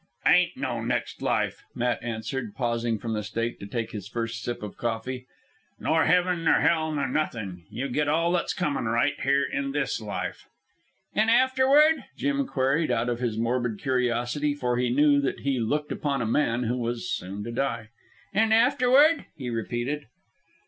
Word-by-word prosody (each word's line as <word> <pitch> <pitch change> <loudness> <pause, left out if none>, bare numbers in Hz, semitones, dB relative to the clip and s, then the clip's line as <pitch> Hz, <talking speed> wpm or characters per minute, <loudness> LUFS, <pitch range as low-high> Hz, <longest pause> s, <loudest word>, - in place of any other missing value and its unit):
"Ain't - - +4
no - - -2
next - - -2
life," - - 0
Matt 120 0 0
answered, 115 0 -4
pausing 115 -2 -1
from 115 +1 -4
the 105 - -1
steak 115 +3 -3
to 100 - -7
take 115 +1 -3
his 100 -3 -6
first 115 -1 -4
sip 120 0 -4
of 105 - -6
coffee. 125 +2 -3 0.5
"Nor 160 0 +2
heaven 180 0 +2
nor - - +4
hell, 160 -1 +2
nor 145 -3 -1
nothin'. 110 - -3
You 135 +3 -3
get 145 +3 0
all 165 +3 +2
that's 175 -1 0
comin' 150 -8 -1
right 120 +5 +2
here 140 +1 +3
in 140 0 -2
this 140 -5 -1
life." 105 -2 -5 0.7
"An' 220 +1 +2
afterward?" 260 +6 +4
Jim 280 -1 0
queried 140 - +1
out 115 +2 +1
of 120 -1 -2
his 120 -3 -2
morbid 120 -1 0
curiosity, 125 +2 0
for 125 -4 -1
he 125 0 +1
knew 145 +2 +4
that 140 - -2
he 135 -2 0
looked 150 +6 -1
upon 140 -2 -1
a 120 - -1
man 115 0 +1
that 120 +2 0
was 120 0 -3
soon 105 -3 -4
to 115 - -5
die. 115 -3 -2 0.4
"An' 220 +2 +3
afterward?" 265 +6 +5
he 125 -4 -4
repeated. 120 +6 -3
125 Hz, 175 wpm, -26 LUFS, 115-150 Hz, 0.7 s, afterward